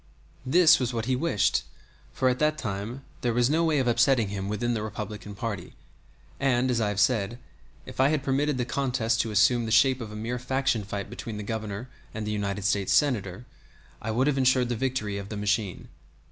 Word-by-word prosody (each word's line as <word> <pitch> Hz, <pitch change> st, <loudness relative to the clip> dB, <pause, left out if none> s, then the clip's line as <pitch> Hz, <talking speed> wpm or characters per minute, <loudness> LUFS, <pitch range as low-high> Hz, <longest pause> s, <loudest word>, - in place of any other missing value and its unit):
This 165 Hz, +3 st, +6 dB
was 125 Hz, -2 st, -2 dB
what 115 Hz, -1 st, -2 dB
he 130 Hz, +1 st, +1 dB
wished, 125 Hz, -8 st, +1 dB, 0.5 s
for 130 Hz, -, 0 dB
at 125 Hz, 0 st, +1 dB
that 155 Hz, 0 st, +2 dB
time 110 Hz, +3 st, -5 dB, 0.2 s
there 120 Hz, -2 st, 0 dB
was 120 Hz, +2 st, +3 dB
no 165 Hz, +2 st, +2 dB
way 160 Hz, -2 st, +2 dB
of 130 Hz, -2 st, +1 dB
upsetting 120 Hz, -2 st, +3 dB
him 100 Hz, -1 st, -4 dB
within 120 Hz, +3 st, -1 dB
the 110 Hz, -, -2 dB
Republican 105 Hz, -1 st, -6 dB
party; 100 Hz, -, -5 dB, 0.7 s
and, 130 Hz, -1 st, +2 dB
as 120 Hz, -2 st, +1 dB
I 105 Hz, -, +1 dB
have 105 Hz, -1 st, -2 dB
said, 115 Hz, 0 st, +2 dB, 0.5 s
if -, -, -11 dB
I 130 Hz, -, +5 dB
had 150 Hz, -3 st, 0 dB
permitted 140 Hz, +1 st, +1 dB
the 125 Hz, -, -1 dB
contest 125 Hz, -4 st, 0 dB
to 115 Hz, -, -3 dB
assume 115 Hz, +3 st, +3 dB
the 110 Hz, -, -4 dB
shape 130 Hz, +3 st, +4 dB
of 110 Hz, -2 st, -6 dB
a -, -, -8 dB
mere 115 Hz, +3 st, -3 dB
faction 130 Hz, -2 st, 0 dB
fight 100 Hz, 0 st, -5 dB
between 110 Hz, -2 st, -7 dB
the 105 Hz, -, -5 dB
Governor 110 Hz, +1 st, -4 dB, 0.3 s
and 110 Hz, -1 st, -3 dB
the 105 Hz, -, -2 dB
United 100 Hz, -1 st, -2 dB
States 100 Hz, 0 st, +1 dB
Senator, 115 Hz, -7 st, +1 dB, 0.6 s
I 115 Hz, -, -4 dB
would 120 Hz, +4 st, +1 dB
have 140 Hz, -2 st, +1 dB
insured 130 Hz, -1 st, +3 dB
the 120 Hz, -, 0 dB
victory 110 Hz, -5 st, -2 dB
of 100 Hz, 0 st, -8 dB
the 105 Hz, -, -5 dB
machine. 105 Hz, -1 st, -1 dB
115 Hz, 210 wpm, -27 LUFS, 105-130 Hz, 0.7 s, This